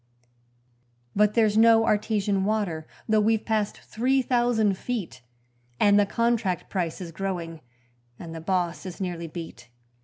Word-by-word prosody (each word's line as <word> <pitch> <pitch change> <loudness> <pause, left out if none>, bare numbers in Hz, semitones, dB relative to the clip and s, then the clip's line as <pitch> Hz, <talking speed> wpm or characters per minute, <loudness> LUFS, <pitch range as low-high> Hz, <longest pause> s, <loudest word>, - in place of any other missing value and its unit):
But 210 0 +3
there's 215 -2 +3
no 225 0 +6
artesian 205 -3 +1
water, 195 -7 -1 0.2
though 215 -1 +3
we've 220 +1 +1
passed 215 -2 -1
three 260 +4 0
thousand 240 -5 +2
feet, 195 - -5 0.6
And 205 0 +5
the 205 - +3
contract 230 -5 0
price 175 -3 -2
is 170 -2 -6
growing 170 -3 -4 0.6
and 165 -1 -8
the 165 - -7
boss 180 -1 -1
is 180 - -8
nearly 175 -3 -4
beat. 155 -8 -9
205 Hz, 140 wpm, -26 LUFS, 175-220 Hz, 0.6 s, no